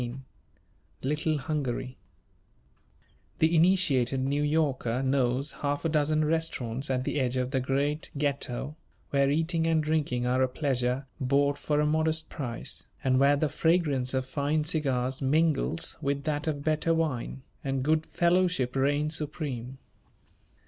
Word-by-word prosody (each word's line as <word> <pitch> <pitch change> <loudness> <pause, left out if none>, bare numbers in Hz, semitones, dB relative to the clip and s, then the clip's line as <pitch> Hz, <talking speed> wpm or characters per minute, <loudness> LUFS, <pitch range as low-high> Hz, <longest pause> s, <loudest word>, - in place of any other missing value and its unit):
XVI 120 +2 -5 0.8
LITTLE 150 +3 0
HUNGARY 130 -3 -3 1.4
The 160 +2 +3
initiated 155 -8 +3
New 140 +2 0
Yorker 140 -5 0
knows 130 +1 +1
half 145 +2 -3
a - - +2
dozen 155 0 +2
restaurants 150 -5 -2
at 130 -1 0
the 145 - -1
edge 130 -1 0
of 125 0 -1
the 135 - +1
great 140 +4 -1
Ghetto, 140 -1 -2 0.4
where 140 -1 +3
eating 165 +2 +1
and 160 -1 +2
drinking 150 -6 0
are 125 +1 +2
a 130 - +4
pleasure 130 -1 -1
bought 140 +1 +2
for 150 -1 0
a 150 - +3
modest 160 +1 0
price, 120 -6 -5 0.2
and 130 -1 +3
where 140 +1 +5
the 155 +2 +1
fragrance 145 -4 +1
of 130 0 0
fine 145 +3 0
cigars 135 -4 -1
mingles 155 +3 +1
with 140 0 -1
that 150 +1 -2
of 145 -2 -2
better 155 +2 +1
wine, 135 -5 -2 0.2
and 135 -1 -1
good 155 +2 +1
fellowship 175 -7 +1
reigns 145 +3 +1
supreme. 140 -5 -4
145 Hz, 140 wpm, -28 LUFS, 130-155 Hz, 1.4 s, where